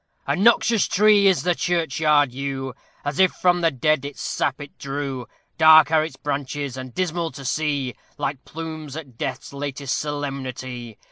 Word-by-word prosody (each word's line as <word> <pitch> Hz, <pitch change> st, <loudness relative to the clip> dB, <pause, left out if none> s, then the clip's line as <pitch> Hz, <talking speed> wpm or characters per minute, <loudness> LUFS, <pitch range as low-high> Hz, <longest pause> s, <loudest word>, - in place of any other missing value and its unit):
A -, -, +1 dB
noxious 225 Hz, +1 st, +4 dB
tree 205 Hz, 0 st, +5 dB
is 190 Hz, -2 st, +3 dB
the 180 Hz, 0 st, +2 dB
churchyard 155 Hz, -5 st, +2 dB
yew, 135 Hz, 0 st, -4 dB, 0.3 s
As 145 Hz, +2 st, -3 dB
if 190 Hz, -1 st, +5 dB
from 175 Hz, -1 st, +2 dB
the 165 Hz, -, +4 dB
dead 155 Hz, +1 st, +1 dB
its 140 Hz, 0 st, -7 dB
sap -, -, -1 dB
it 145 Hz, -1 st, -10 dB
drew; 135 Hz, -3 st, -4 dB, 0.3 s
Dark 160 Hz, 0 st, +8 dB
are 155 Hz, -1 st, +4 dB
its 160 Hz, -, -6 dB
branches, 140 Hz, -1 st, -3 dB
and 130 Hz, -1 st, -7 dB
dismal 170 Hz, +1 st, -1 dB
to 135 Hz, -, -9 dB
see, 140 Hz, -2 st, -1 dB, 0.2 s
Like 140 Hz, -2 st, -3 dB
plumes 155 Hz, -3 st, -7 dB
at 140 Hz, -7 st, -9 dB
Death's 130 Hz, +2 st, -4 dB
latest 140 Hz, -1 st, -3 dB
solemnity. 130 Hz, -5 st, -5 dB
145 Hz, 160 wpm, -23 LUFS, 135-160 Hz, 0.3 s, Dark